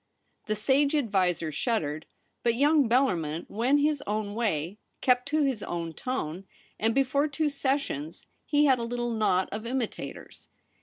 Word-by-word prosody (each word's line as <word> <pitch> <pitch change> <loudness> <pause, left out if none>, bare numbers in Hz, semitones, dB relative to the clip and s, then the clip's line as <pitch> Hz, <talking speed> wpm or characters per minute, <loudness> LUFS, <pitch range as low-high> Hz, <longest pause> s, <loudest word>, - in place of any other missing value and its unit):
The 215 - 0
sage 275 +7 +2
adviser 185 - +1
shuddered; 155 - -2 0.3
but 235 -1 +2
young 285 -1 +4
Bellarmin 175 - +1
went 255 +7 +2
his 295 -1 +1
own 210 0 -2
way, 200 -4 -1 0.2
kept 250 0 +2
to 305 +1 +2
his 265 -6 0
own 170 -3 -4
tone; 190 - -4 0.3
and 225 +1 +1
before 275 +2 +2
two 300 +1 0
sessions 270 - -2 0.2
he 295 0 +4
had 265 -3 +4
a - - -2
little 240 0 -2
knot 210 -5 +2
of 215 +2 -5
imitators. 250 -2 -5
235 Hz, 150 wpm, -28 LUFS, 190-275 Hz, 0.3 s, young